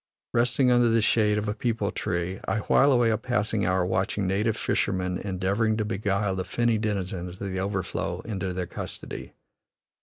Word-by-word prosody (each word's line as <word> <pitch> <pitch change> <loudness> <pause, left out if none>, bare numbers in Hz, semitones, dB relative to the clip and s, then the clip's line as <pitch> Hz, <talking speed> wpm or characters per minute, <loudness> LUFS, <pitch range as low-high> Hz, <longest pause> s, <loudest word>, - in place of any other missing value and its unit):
Resting 120 +2 +3
under 120 -1 +5
the 115 0 +4
shade 105 -1 +3
of 105 0 -1
a 105 - 0
peepul 110 -2 -1
tree, 90 +2 -2
I 110 - 0
while 140 +6 +4
away 120 -3 +4
a 110 - 0
passing 110 -5 0
hour 90 0 +2
watching 95 +2 0
native 105 +4 +1
fishermen 90 -2 0
endeavoring 100 +3 0
to 110 - 0
beguile 100 -1 0
the 95 - -2
finny 115 +4 +1
denizens 95 -4 -3
of 100 -1 -4
the 95 - -2
overflow 95 -1 -2
into 95 -4 -3
their 90 0 -2
custody. - - -7
105 Hz, 175 wpm, -26 LUFS, 95-115 Hz, -, under